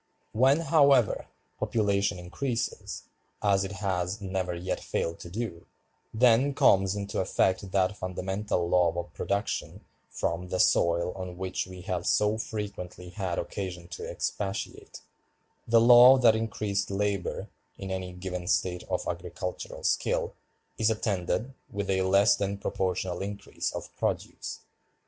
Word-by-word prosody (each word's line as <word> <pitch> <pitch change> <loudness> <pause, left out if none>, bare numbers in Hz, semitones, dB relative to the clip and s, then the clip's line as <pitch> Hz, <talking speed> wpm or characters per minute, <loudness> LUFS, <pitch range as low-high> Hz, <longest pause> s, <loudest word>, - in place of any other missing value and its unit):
When, 135 +7 +4
however, 140 -8 +4 0.3
population 100 -3 +1
increases, 115 +8 -3 0.4
as 100 -2 +3
it 95 +1 -5
has 95 0 -2
never 95 -2 -2
yet 90 +2 -3
failed 85 0 -2
to 85 - -9
do, 95 -4 -5 0.4
then 125 +4 +4
comes 95 0 +4
into 100 -1 -3
effect 95 +1 +1
that 95 +1 +1
fundamental 95 -1 -2
law 85 -1 +4
of 85 0 -5
production 100 +1 -3 0.2
from 85 +2 -2
the 90 - -2
soil 85 +1 +3
on 90 -2 -6
which 95 0 -3
we 90 -1 -9
have 90 -2 -3
so 105 +1 +2
frequently 100 -6 -5
had 90 -1 -3
occasion 90 -4 -4
to 90 - -6
expatiate, 100 0 -4 0.7
the 115 0 +6
law 120 +3 +9
that 120 -4 +5
increased 105 -2 -1
labor, 100 -2 -2 0.3
in 95 -1 -6
any 95 -1 -3
given 90 -1 -5
state 90 -1 +1
of - - -1
agricultural 90 +1 -5
skill, - - 0 0.5
is 110 - +4
attended 110 +3 -1 0.2
with 100 -1 -2
a 95 0 +2
less 100 +2 +5
than 100 0 -2
proportional 90 -2 -2
increase 100 +1 -4
of - - -7
produce. - - -3
95 Hz, 135 wpm, -28 LUFS, 90-105 Hz, 0.7 s, law